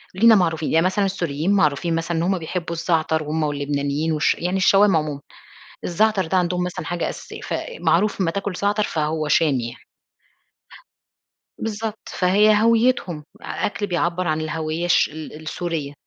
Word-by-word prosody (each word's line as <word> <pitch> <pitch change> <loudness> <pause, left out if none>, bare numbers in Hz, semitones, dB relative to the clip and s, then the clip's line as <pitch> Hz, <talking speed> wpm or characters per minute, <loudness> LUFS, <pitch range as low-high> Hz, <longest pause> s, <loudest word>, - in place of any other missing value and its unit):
لينا 225 +3 +6
معروفين 165 -4 +1
يعني 165 +2 +4
مثلًا 200 +2 +1
السوريين 170 -3 -1
معروفين 165 -2 +2
مثلًا 165 +1 -2
إن 165 - 0
هُم 190 +1 +1
بيحبوا 170 +1 -4
الزعتر، 160 -2 0
هُم 155 +1 -2
واللبنانيين، 145 +1 -1
والش 150 -1 +2
يعني 180 +3 -2
الشوام 195 0 +5
عمومًا. 150 -2 -1 0.6
الزعتر 200 +1 +1
ده 185 +4 0
عندهم 180 0 0
مثلًا 180 - -5
حاجة 175 -1 -2
أساسية، - - -9
ف - - -4 0.3
معروف 175 +5 +2
أمّا 170 - +2
تاكل 200 +1 -3
زعتر 205 +1 +1
فهو 155 -1 -1
شامي 140 -6 +2
يعني. 120 - -12 1.7
بالضبط. 220 0 -5
فهي 205 +4 +3
هَويتهم، 225 -7 +2 0.2
أ - - -10 0.2
أكل 205 0 -3
بيعبر 175 0 -1
عن 155 0 0
الهَوية 155 +1 -3
الش 175 - +3
ال 155 0 -9
السورية. 155 -3 -4
170 Hz, 155 wpm, -22 LUFS, 155-195 Hz, 1.7 s, لينا